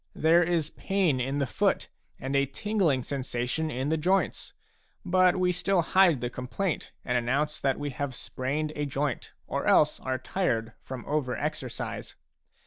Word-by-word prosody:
There 165 +2 +5
is 165 -3 +1
pain 185 -9 +1
in 135 +3 -1
the 140 - +1
foot, - - +1 0.3
and 135 +2 -3
a 140 0 +3
tingling 175 - +1
sensa 125 -3 -3
tion 160 +5 -1
in 130 +1 -2
the 160 - +2
joints; 185 +5 0 0.5
but 185 0 +4
we 180 -1 +2
still 180 0 +1
hide 175 -6 +4
the 120 - -1
complaint 150 +9 -3
and 125 -1 +2
announce 140 +6 0
that 135 -1 +1
we 145 -1 -3
have 140 -1 -3
sprained 150 +5 -3
a 145 -1 -1
joint, 140 -2 -2
or - - -2
else - - +4
are 130 0 -2
tired 125 -5 -1
from 130 -2 -7
over 145 -4 -1
exercise. 145 -5 -4
145 Hz, 165 wpm, -28 LUFS, 130-175 Hz, 0.5 s, There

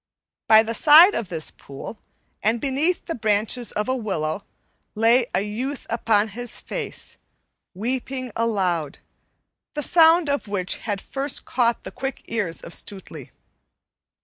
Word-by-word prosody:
By 220 0 +7
the 225 +1 -3
side 320 - +8
of 215 -6 -3
this 160 -3 -3
pool, 140 +10 -10 0.4
and 225 +3 +1
beneath 285 +8 0
the 335 - -3
branches 220 +1 +1
of 210 +2 -2
a 260 - +1
willow, 190 -7 -3 0.5
lay 230 +3 +4
a 185 - +2
youth 245 +7 -4
upon 220 -2 +2
his 240 +3 -4
face, - - -6 0.6
weeping 255 +4 -3
aloud, 185 -10 -1 0.8
the 295 - -2
sound 330 0 +5
of 285 -5 -1
which 185 -3 -1
had 205 -4 -4
first 275 0 -2
caught 240 -2 0
the - - -7
quick 270 0 -5
ears 205 -8 -2
of 170 - -8
Stutely. 170 -8 -7
230 Hz, 140 wpm, -23 LUFS, 200-265 Hz, 0.8 s, side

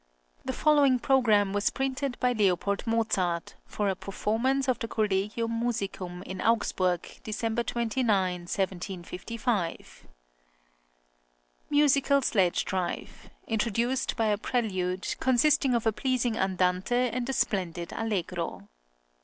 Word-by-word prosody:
The - - -2
following 290 -4 +4
programme 220 -7 +3
was 205 0 +2
printed 270 -1 -2
by 250 0 +2
L. 200 -6 +3 0.3
Mozart, 190 -7 0
for 210 - -2
a 190 - +1
performance 235 +9 -1
of 255 - +1
the 230 - -3
Collegium 215 +2 -1
Musicum 195 -6 -3
in 190 0 -6
Augsburg, 185 -6 +1 0.2
December 225 +1 -1
29, 235 +1 -1
1755: 185 +2 -3 1.6
MUSICAL 280 -1 +3
SLEDGE 190 -7 +2
DRIVE. 185 -2 -4 0.2
Introduced 230 +3 0
by 225 - +1
a 210 -2 +1
prelude, 190 -7 -1
consisting 260 +1 +3
of 230 - 0
a 225 - +3
pleasing 250 -1 0
andante 185 +3 +1 0.2
and 245 +2 -3
a - - 0
splendid 175 -7 -1
allegro. 180 - -3
220 Hz, 110 wpm, -28 LUFS, 185-245 Hz, 1.6 s, following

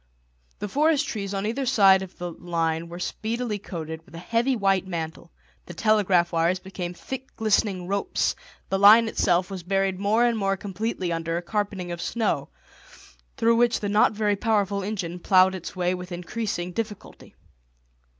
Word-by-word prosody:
The 210 - -4
forest 295 +5 +2
trees 200 -3 -4
on 195 0 -2
either 255 +5 -2
side 195 -6 +6
of 190 -1 -9
the 175 0 -5
line 165 -1 -2
were 170 - -7
speedily 220 +3 -3
coated 160 -4 -7
with 165 - -16
a - - -7
heavy 230 +9 0
white 195 -3 +1
mantle, 165 -1 -5 0.4
the 175 - -9
telegraph 195 -3 +3
wires 170 +2 +2
became 185 -1 -6
thick 265 +7 -8
glistening 205 -4 +1
ropes, 200 +1 0 0.3
the 195 - 0
line 215 +3 +8
itself 180 -3 +1
was 190 -2 -5
buried 195 +1 0
more 215 +4 +3
and 235 -2 +1
more 195 -1 0
completely 195 -2 -3
under 165 0 -2
a 175 - -4
carpeting 195 -2 -3
of 170 0 -5
snow, 225 +5 -1 0.9
through 230 0 +3
which 240 0 +3
the 205 - -3
not 210 +2 +4
very 210 -1 +1
powerful 200 -2 0
engine 185 -4 -4
ploughed 185 +1 +4
its 185 -1 -7
way 180 0 0
with 180 0 -7
increasing 180 0 -3
difficulty. 215 +1 -7
195 Hz, 170 wpm, -25 LUFS, 175-220 Hz, 0.9 s, line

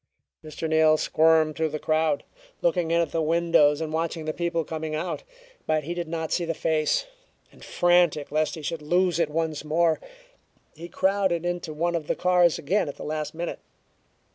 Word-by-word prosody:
Mr. 155 +1 -5
Neal 155 0 +4
squirmed 160 -1 +3
through 160 -1 0
the 155 - -4
crowd, 160 +4 0 0.4
looking 170 -1 +1
in 170 +1 +3
at 165 - -2
the 165 - 0
windows 160 -2 +3
and 155 -1 -4
watching 165 0 -2
the 155 - -2
people 170 -1 -1
coming 155 0 -4
out; 170 +4 -3 0.5
but 155 -1 +1
he 170 +4 -4
did 175 -1 -4
not 160 -1 -4
see 175 - +1
the 165 -1 -2
face, 155 - 0 0.5
and - - -17
frantic 175 -5 +2
lest 155 +1 0
he 160 - -9
should 165 +1 -3
lose 175 +3 +1
it 165 -3 +1
once 160 -1 -2
more, 160 +1 +1 0.7
he 170 +2 -10
crowded 190 -3 +1
into 175 -2 -3
one 170 +3 -1
of 160 -3 -3
the - - 0
cars 180 -2 +3
again 170 +2 0
at - - -7
the - - -9
last 155 0 -4
minute. 170 +1 -4
160 Hz, 190 wpm, -25 LUFS, 155-170 Hz, 0.7 s, Neal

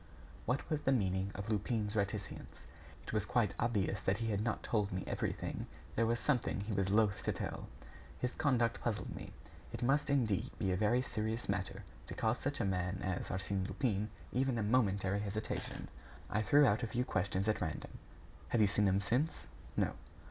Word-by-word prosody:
What 125 +4 0
was 155 -1 0
the 135 - +2
meaning 95 -5 +1
of 100 +3 -3
Lupin's 105 0 0
reticence? 100 0 -3 0.4
It - - -7
was 105 -3 +2
quite 105 -5 +2
obvious 105 -4 +1
that 95 +1 +1
he 115 0 -1
had 100 0 +1
not 115 0 -1
told 105 -3 +1
me 95 0 -2
everything; - - -2 0.3
there 115 0 +3
was 120 +1 +1
something 125 -6 +1
he 105 +2 -3
was 95 -1 +1
loath 105 -2 +3
to - - +1
tell. - - -4 0.5
His 125 - -1
conduct 120 -6 +2
puzzled 105 -5 -2
me. - - -7 0.4
It - - -4
must 140 +5 +3
indeed 115 -9 +2
be 95 - +1
a - - +2
very 110 +6 +3
serious 110 0 -2
matter 100 -1 -2 0.2
to - - -6
cause 110 +1 +1
such 140 +1 -2
a - - +1
man 90 0 0
as 95 0 -1
Arsène 95 0 -1
Lupin 105 +1 0 0.2
even 130 -1 +1
a 110 - +1
momentary 100 -4 +2
hesitation. 105 +1 -3 0.4
I 110 - +2
threw 145 +8 +6
out 115 -1 +3
a 115 - 0
few 125 +3 0
questions 95 0 0
at 110 - +1
random. 80 -3 -4 0.5
"Have 115 - +3
you - - +7
seen 105 +1 +3
them 95 0 +3
since?" 130 +10 0 0.3
"No." - - +3
105 Hz, 190 wpm, -35 LUFS, 95-120 Hz, 0.5 s, you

